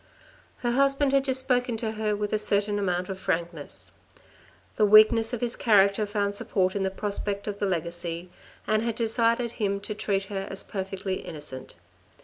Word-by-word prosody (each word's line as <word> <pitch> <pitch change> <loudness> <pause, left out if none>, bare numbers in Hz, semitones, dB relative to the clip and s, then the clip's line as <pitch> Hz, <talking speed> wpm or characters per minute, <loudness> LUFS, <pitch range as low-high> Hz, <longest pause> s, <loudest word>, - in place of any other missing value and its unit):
Her 240 - +2
husband 275 +2 +2
had 275 0 +3
just 260 -1 +1
spoken 250 -2 0
to 220 -1 -2
her 215 -1 -1
with 205 0 -3
a 215 - +2
certain 205 0 0
amount 180 -2 -1
of 190 -1 -6
frankness. 170 -4 -4 0.8
The 215 - +4
weakness 220 +2 +6
of 245 - -3
his 240 -1 0
character 205 -1 +3
found 205 -1 -1
support 190 -2 0
in 200 - -1
the 190 - +1
prospect 200 0 -3
of 205 -1 -4
the 200 - 0
legacy, 170 0 -3 0.3
and 215 0 +2
had 230 -1 -2
decided 230 +1 +1
him 200 -4 -1
to 205 - -5
treat 200 -2 -1
her 195 0 -5
as 195 - -3
perfectly 190 -1 -4
innocent. 145 -5 -8
205 Hz, 175 wpm, -26 LUFS, 190-225 Hz, 0.8 s, weakness